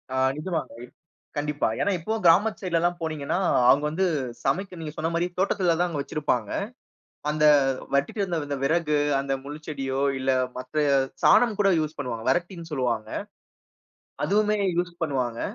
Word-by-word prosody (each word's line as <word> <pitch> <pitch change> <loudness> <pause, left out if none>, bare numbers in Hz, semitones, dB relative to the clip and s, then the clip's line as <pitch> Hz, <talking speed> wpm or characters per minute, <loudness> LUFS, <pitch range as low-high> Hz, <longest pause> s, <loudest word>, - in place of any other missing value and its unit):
ஆ - - 0 0.2
நிஜமாங்க. 165 +2 -3 0.6
கண்டிப்பா. 145 0 0
ஏன்னா, 200 - +2
இப்பவும் 215 +6 -3
கிராமத்து 205 +6 +4
சைட் 180 -3 -2
லல்லாம் 175 +1 +1
போனீங்கன்னா, 155 0 -2 0.3
அவுங்க 145 - +5
வந்து 185 +5 0 0.4
சமைக்க 180 +5 -1
நீங்க 155 - -5
சொன்னமாரி 170 +2 -1
தோட்டத்தில 185 -2 +2
தான் 180 - +2
அங்க 150 - -3
வச்சிருப்பாங்க. 135 -7 -1 0.8
அந்த 150 0 +2 0.5
வெட்டிட்டு 145 +9 0
வந்த 175 -3 -1
அந்த 140 -1 -2
விறகு 150 +1 +2 0.2
அந்த 135 0 -1
முள் 145 +2 -7
செடியோ! 135 -2 -2 0.2
இல்ல 130 0 +1 0.3
மத்த 150 +4 -1 0.4
சாணம் 235 -4 +5
கூட 195 -1 +4
யூஸ் 155 0 -3
பண்ணுவாங்க. 115 -4 -4
வரட்டின்னு 175 -2 -2
சொல்லுவாங்க. 120 -6 -1 1.2
அதுவுமே 210 +1 +2 0.2
யூஸ் 175 0 -1
பண்ணுவாங்க. 125 -5 -2
155 Hz, 145 wpm, -25 LUFS, 140-180 Hz, 1.2 s, அவுங்க